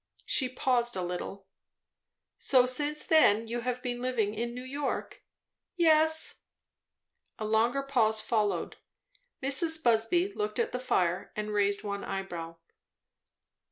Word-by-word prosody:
She 260 -2 0
paused 245 -2 0
a 185 - -3
little. 180 +2 -6 0.9
"So 255 -2 +4
since 290 +4 -1
then 230 -9 +4
you 235 +2 -3
have 250 +1 -4
been 245 -1 -4
living 235 -5 -1
in 235 +2 -4
New 250 - -7
York?" 275 +2 -4 0.5
"Yes." 315 -2 +4 0.9
A 215 - -5
longer 230 +5 +1
pause 225 -6 +1
followed. 210 -5 -1 0.7
Mrs. 320 +4 +4
Busby 240 - +2
looked 420 0 -4
at 465 - -1
the 250 - -3
fire 185 -9 -1
and 210 0 -4
raised 200 -1 0
one 200 -1 -4
eyebrow. 175 -4 -6
240 Hz, 125 wpm, -29 LUFS, 210-275 Hz, 0.9 s, So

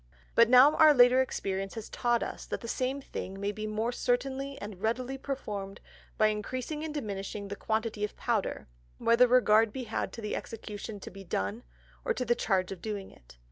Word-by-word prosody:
But 230 0 +6
now 255 +4 +8
our 310 -2 +7
later 250 +1 +7
Experience 195 -6 -3
has 225 -2 -6
taught 240 -1 +1
us - - -6
that - - -4
the 230 - -7
same 260 +4 -1
thing 195 -6 -6
may 200 +1 -1
be 215 +1 -5
more 220 +3 -1
certainly 265 +3 -1
and 205 -2 -8
readily 245 +4 -1
performed 210 -8 -5 0.4
by 215 - +5
increasing 255 +8 -3
and 315 - -3
diminishing 200 -6 -5
the 200 - -4
quantity 220 0 -2
of 210 - -3
Powder, - - -1 0.3
whether 235 +2 +5
regard 225 -3 +5
be 260 +2 -5
had 225 -2 -3
to 230 - -7
the 210 - -3
Execution 210 -1 -6
to - - -8
be 195 +1 -10
done, 100 - -2 0.4
or - - 0
to 250 - -2
the 240 - +3
Charge 190 -5 0
of 190 -3 -7
doing 205 -2 -5
it. - - -19
225 Hz, 195 wpm, -30 LUFS, 205-255 Hz, 0.4 s, now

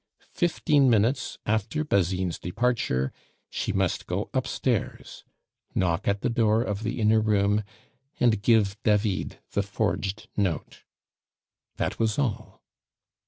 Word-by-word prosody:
Fifteen 150 -5 +3
minutes 115 +4 +1
after 110 +8 0
Basine's 95 - 0
departure 90 - 0 0.4
she - - -2
must - - -1
go - - -3
upstairs, - - -2 0.5
knock 90 +1 0
at 100 0 +1
the - - +1
door 115 -1 +3
of 105 -3 -3
the 115 +2 -3
inner 110 0 +4
room, 105 0 +2 0.6
and 115 -4 +3
give 105 -2 +3
David 105 -3 +1
the 100 - +1
forged 100 0 -2
note. 95 -6 -2 1.0
That - - -2
was 110 -2 +1
all. 130 -7 -3
105 Hz, 120 wpm, -26 LUFS, 100-115 Hz, 1.0 s, inner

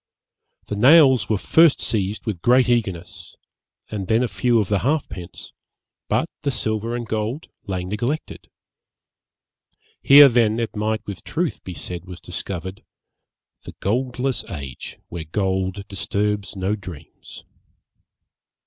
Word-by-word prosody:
The 105 - -4
nails 130 +3 +6
were 110 - +2
first 160 - +4
seized 105 -2 -2
with 100 -7 -3
great 125 +3 +4
eagerness, 95 -8 -2 0.6
and 100 -3 -4
then 115 +3 +3
a - - +1
few 120 0 +1
of 105 -4 +1
the 100 0 +1
halfpence, 115 - -3 0.6
but - - +1
the 145 - -1
silver 110 -2 -2
and 120 -1 -4
gold 110 +7 -3 0.2
lay 95 -2 -2
neglected.' 120 +11 -4 1.5
Here 140 +1 +9
then 115 -3 +2
it 115 -1 -3
might 110 +1 -1
with 100 -3 -7
truth - - -3
be 90 - -7
said 90 -1 -6
was 90 -2 -9
discovered 95 +1 -6 0.8
The - - -10
goldless 125 +4 -1
age, 70 -8 -7
where 85 -2 -5
gold 95 +3 -2
disturbs 100 +1 -2
no 95 +2 -1
dreams. 90 -7 -11
105 Hz, 130 wpm, -22 LUFS, 95-120 Hz, 1.5 s, Here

